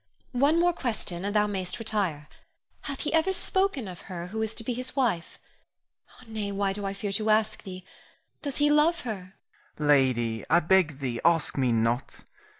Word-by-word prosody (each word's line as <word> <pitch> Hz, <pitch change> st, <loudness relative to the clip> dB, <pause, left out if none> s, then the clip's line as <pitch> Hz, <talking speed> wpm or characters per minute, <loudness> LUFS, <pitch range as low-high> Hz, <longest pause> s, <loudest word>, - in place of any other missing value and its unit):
One 285 Hz, +6 st, +3 dB
more 350 Hz, 0 st, +4 dB
question 215 Hz, -, -3 dB
and 200 Hz, +1 st, -2 dB
thou 210 Hz, 0 st, +5 dB
mayst 190 Hz, -3 st, -3 dB
retire. 195 Hz, -10 st, -2 dB, 0.6 s
Hath 280 Hz, -2 st, -4 dB
he 300 Hz, -, -2 dB
ever 325 Hz, +4 st, +3 dB
spoken 380 Hz, -, 0 dB
of 180 Hz, -2 st, -8 dB
her 175 Hz, -1 st, -5 dB
who 220 Hz, +3 st, -3 dB
is 220 Hz, 0 st, -2 dB
to 230 Hz, -, -3 dB
be 245 Hz, -, -2 dB
his 255 Hz, +2 st, -5 dB
wife? 230 Hz, -11 st, 0 dB, 0.9 s
Nay, 215 Hz, -2 st, -4 dB
why 200 Hz, -1 st, 0 dB
do 200 Hz, 0 st, -4 dB
I 195 Hz, -, -2 dB
fear 200 Hz, 0 st, -3 dB
to 215 Hz, +2 st, 0 dB
ask 215 Hz, 0 st, +2 dB
thee? 185 Hz, -1 st, -9 dB, 0.6 s
Does 285 Hz, -2 st, -4 dB
he 295 Hz, 0 st, +4 dB
love 315 Hz, +3 st, +4 dB
her? 195 Hz, -5 st, -6 dB, 0.4 s
Rienzi. 150 Hz, -, -2 dB
Lady, 125 Hz, -6 st, +3 dB
I 170 Hz, -, +6 dB
beg 170 Hz, -4 st, +3 dB
thee 120 Hz, -3 st, -2 dB
ask 165 Hz, -2 st, +3 dB
me 130 Hz, -3 st, +2 dB
not. 115 Hz, +2 st, 0 dB
200 Hz, 185 wpm, -27 LUFS, 170-245 Hz, 0.9 s, I